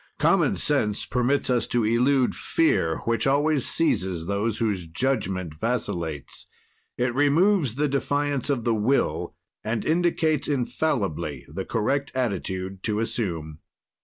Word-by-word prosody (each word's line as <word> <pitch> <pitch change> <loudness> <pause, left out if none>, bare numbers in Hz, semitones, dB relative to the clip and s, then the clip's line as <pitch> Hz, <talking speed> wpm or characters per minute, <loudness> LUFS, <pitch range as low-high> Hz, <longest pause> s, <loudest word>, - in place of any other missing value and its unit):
"Common - - +3
sense 105 -1 +1
permits 125 +4 +1
us 120 -1 +1
to 120 -2 +1
elude 125 +3 +3
fear 80 - +1
which 115 +3 +1
always 145 0 +2
seizes 95 - 0
those 100 +3 -1
whose 100 -7 -1
judgment 95 - -1
vacillates; 85 - -3 0.5
it 120 0 0
removes 145 - +3
the 150 +2 +1
defiance 145 0 -1
of 135 -5 0
the 120 -1 +2
Will 110 +6 0 0.3
and 110 0 -2
indicates 160 -3 +1
infallibly 125 - -1
the 90 +6 -5
correct 135 +5 -1
attitude 95 -5 -2
to 105 +1 -1
assume." 90 -10 -3
120 Hz, 125 wpm, -25 LUFS, 95-140 Hz, 0.5 s, Common